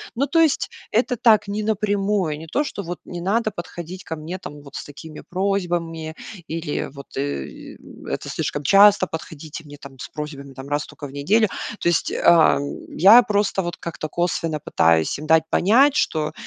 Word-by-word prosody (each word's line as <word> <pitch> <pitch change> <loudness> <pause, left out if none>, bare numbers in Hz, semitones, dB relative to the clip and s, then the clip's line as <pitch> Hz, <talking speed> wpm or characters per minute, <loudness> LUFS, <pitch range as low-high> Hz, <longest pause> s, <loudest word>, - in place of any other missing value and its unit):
Ну, 270 +4 +1
то 330 - +2
есть 320 -4 +2 0.2
это 245 +3 +1
так 220 -3 +4
не 205 +1 -3
напрямую, 205 -6 0
не 160 - -10
то, 275 - 0
что 205 -8 -5
вот 175 0 -6
не 175 -1 -7
надо 215 +4 0
подходить 175 0 -8
ко 160 - -5
мне 160 +4 -6
там 150 -5 -10
вот 140 -1 -13
с - - -5
такими 150 +2 -10
просьбами 175 -4 -2 0.3
или 160 -2 -3
вот, 140 -1 -11
э, 135 - -5 0.3
это - - -4
слишком 145 - -3
часто 200 +3 +6
подходите 160 -1 -8
мне 145 -1 -12
там 140 -1 -11
с - - -6
просьбами 145 -2 -7 0.2
раз 145 0 -1
токо 145 - -9
в - - -12
неделю. 195 +11 +2 0.3
То - - +1
есть, 170 - +1
а, 170 -2 +5 0.3
я 210 +7 +7
просто 205 -2 0
вот 175 -2 -5
как-то 160 -2 -6
косвенно 165 -2 -1
пытаюсь 80 - +2
им 155 - -7
дать 160 0 +5
понять, 265 +9 +4
что, 155 - 0
170 Hz, 180 wpm, -22 LUFS, 150-205 Hz, 0.3 s, я